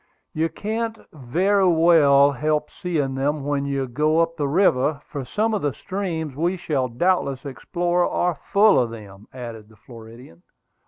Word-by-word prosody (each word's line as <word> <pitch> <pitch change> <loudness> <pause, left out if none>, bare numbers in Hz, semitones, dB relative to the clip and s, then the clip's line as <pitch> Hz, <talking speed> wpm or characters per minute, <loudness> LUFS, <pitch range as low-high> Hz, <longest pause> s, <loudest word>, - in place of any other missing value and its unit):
"You 160 +1 0
can't 225 +3 -4 0.2
very 185 +9 +1
well 160 -5 +5
help 150 +2 -1
seeing 150 -7 -2
them 140 +2 -1
when 145 -1 -1
you 140 -1 -1
go 150 +6 +1
up 165 0 +1
the 145 -3 -1
river, 145 -3 +2
for 140 - -6
some 215 - -1
of 210 - -1
the 145 -2 -1
streams 170 -7 -4
we 175 +5 -1
shall 140 -7 -1
doubtless 140 0 0
explore 175 +5 -1
are 175 -4 -1
full 205 +1 +5
of 120 -2 0
them," 105 -3 -12
added 115 -4 -9
the 110 - -19
Floridian. 115 -4 -14
150 Hz, 160 wpm, -22 LUFS, 130-175 Hz, 0.2 s, well